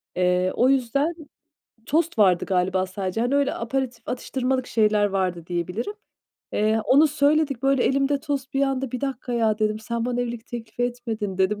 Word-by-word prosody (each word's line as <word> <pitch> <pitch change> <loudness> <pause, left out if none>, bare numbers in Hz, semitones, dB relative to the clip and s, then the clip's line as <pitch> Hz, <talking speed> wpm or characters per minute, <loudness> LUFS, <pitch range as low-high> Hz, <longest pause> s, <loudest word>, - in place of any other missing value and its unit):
Eee, 180 0 +2
o 250 - +4
yüzden 275 +5 +1 0.7
tost 325 -3 0
vardı 185 -4 +4
galiba 185 0 +1
sadece. 185 +2 -3
Hani 245 +4 +1
öyle 280 -1 +2
aperatif 250 +2 -3
atıştırmalık 255 +1 -1
şeyler 210 -2 +2
vardı 185 -4 -2
diyebilirim. 180 - -3 0.6
Eee, 215 +1 +2
onu 275 +7 +6
söyledik. 290 -3 +1
Böyle 270 -2 +3
elimde 275 +1 +1
tost 275 -2 -3
bir 275 - +2
anda, 270 -2 0
"1 250 - -3
dakika 265 -3 -4
ya!" 220 -2 +1
dedim. 215 0 0
"Sen 235 +1 -3
bana 245 0 -1
evlilik 235 -2 -4
teklifi 240 0 -6
etmedin." 230 -5 -3
dedim. 200 +2 +1
240 Hz, 165 wpm, -24 LUFS, 205-270 Hz, 0.7 s, onu